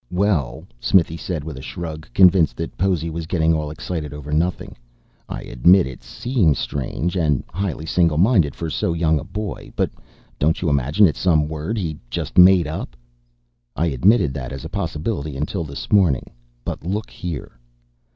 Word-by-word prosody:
"Well," 90 -9 0 0.2
Smithy 80 0 +3
said 85 -2 -4
with 80 -3 -7
a - - -7
shrug, 80 +1 -7
convinced 90 -3 +5
that 80 - -5
Possy 90 -4 0
was 80 0 -5
getting 80 -2 +2
all 75 -2 -1
excited 75 -1 -5
over 75 0 -8
nothing, 85 +4 -1 0.5
"I - - -5
admit 90 +10 +4
it 65 -1 -8
seems 105 - +1
strange 75 +6 -3
and 75 -7 +1
highly 90 -4 -3
single 85 -1 +2
minded 90 - +3
for 85 - -4
so 85 - 0
young 80 -2 +2
a - - -7
boy. 105 -1 -6
But - - 0 0.5
don't 80 +4 +2
you 85 - 0
imagine 70 +8 +3
it's 80 - +1
some 80 -5 +3
word 80 +8 -3
he 80 -7 -3
just - - -1
made 90 -1 +7
up?" 75 -5 -5 0.8
"I 85 +1 +1
admitted 75 - +3
that 65 -3 -5
as - - -7
a - - -5
possibility 80 -5 -3
until 80 +5 -2
this 70 -3 -7
morning. 90 - +3 0.3
But - - -4
look 100 +5 -3
here." 80 -8 -6
80 Hz, 170 wpm, -21 LUFS, 75-90 Hz, 0.8 s, made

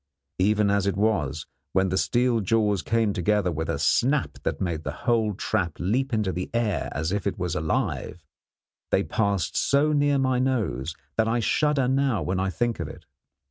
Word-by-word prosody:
Even 105 +1 +3
as 100 -1 +1
it 100 -1 0
was, 85 -9 0 0.3
when 95 0 +2
the 95 - -1
steel 120 -1 +2
jaws 105 -1 +1
came 110 +5 +1
together 95 0 +1
with 80 0 -3
a - - 0
snap 135 +2 +1
that - - -2
made 85 -4 -2
the 70 - -3
whole 110 -4 +2
trap 85 -3 -1
leap 125 +10 0
into 105 -4 0
the 90 0 -4
air 105 -10 0
as 80 +3 -2
if 100 0 -1
it 100 - -2
was 90 -2 -2
alive, 80 -1 -2 0.6
they - - +2
passed 100 -5 -1
so 145 +2 +2
near 145 -1 +3
my 130 -2 +1
nose 105 - -1 0.2
that 110 0 +3
I 115 +2 +1
shudder 145 +2 +2
now 130 - +1
when 90 +4 -1
I 95 0 0
think 120 +4 -1
of - - -3
it. - - -11
105 Hz, 185 wpm, -25 LUFS, 90-120 Hz, 0.6 s, Even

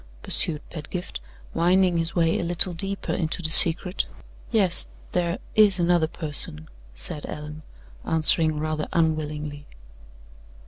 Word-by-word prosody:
pursued 155 -3 -2
Pedgift, 170 - -7 0.3
winding 180 +1 +2
his 165 0 -2
way 165 -2 +1
a - - -3
little 175 +2 0
deeper 195 +3 -5
into 165 +1 -4
the 155 - 0
secret. 175 +3 +7 0.4
"Yes; 195 -6 +2 0.2
there 175 0 -2 0.2
is 205 -3 +3
another 170 -2 +1
person," 145 - -4 0.3
said 145 - -7
Allan, 150 +1 -9 0.4
answering 160 -1 +2
rather 155 0 -4
unwillingly. 150 -3 -3
165 Hz, 120 wpm, -23 LUFS, 155-175 Hz, 0.4 s, secret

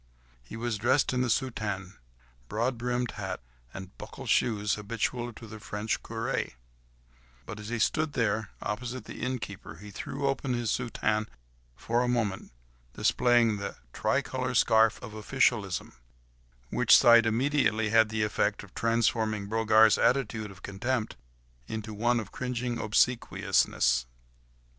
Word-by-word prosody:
He - - -10
was 115 -2 -2
dressed 130 +5 +2
in 125 - +1
the 125 - 0
soutane, 105 -6 -2 0.6
broad 120 +4 0
brimmed 120 0 -2
hat 95 -3 -5 0.3
and 95 -1 -9
buckled - - -8
shoes 105 -4 +2
habitual 115 +3 -2
to 115 - -11
the 110 0 -10
French 105 +1 -3
curé, 115 - -3 0.9
but 110 - -7
as 105 0 -7
he 120 - -2
stood 155 +7 0 0.5
opposite 120 +4 -4
the - - -9
innkeeper, 110 -9 -5
he 105 +5 -11
threw 140 +7 -5
open 135 -2 -1
his 120 -2 -1
soutane 110 -3 -1 0.5
for 120 +1 0
a 125 - 0
moment, 115 -6 -1 0.4
displaying 120 -3 +3
the 100 0 -5 0.2
tricolour - - -1
scarf 110 -1 +4
of 110 -3 -8
officialism, 110 -3 0 0.8
which - - +6
sight 115 -1 +7
immediately 110 -2 +1
had 110 -1 +5
the 110 0 -1
effect 105 -1 0
of 100 - -15
transforming 110 -2 +1
Brogard's 110 0 +4
attitude 120 -5 +1
of 95 -1 -14
contempt, 110 +3 -2 0.5
into 110 -1 -5
one 120 +3 +1
of 110 - -7
cringing 125 -1 -3
obsequiousness. 105 - +2
110 Hz, 135 wpm, -29 LUFS, 105-120 Hz, 0.9 s, sight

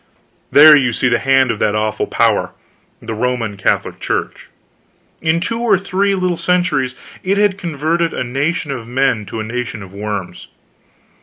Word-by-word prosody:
There 150 +1 +9
you 125 -4 +2
see 130 +2 +1
the - - +2
hand 135 -2 +3
of 110 - -5
that 105 -1 +1
awful 110 0 -1
power, - - +1 0.5
the 115 - -6
Roman 115 -2 -2
Catholic 95 - -1
Church. - - -3 0.7
In 160 +1 +1
two 230 +6 -2
or 235 -4 +3
three 195 +1 0
little 185 -2 -1
centuries 170 -7 0 0.3
it 195 +2 0
had 205 -2 +3
converted 165 -2 -1
a - - -3
nation 140 +5 -2
of 120 -4 -6
men 125 -4 0
to 110 - -6
a - - -2
nation 120 -1 -5
of 95 -1 -13
worms. 100 -2 -5
135 Hz, 165 wpm, -17 LUFS, 115-175 Hz, 0.7 s, There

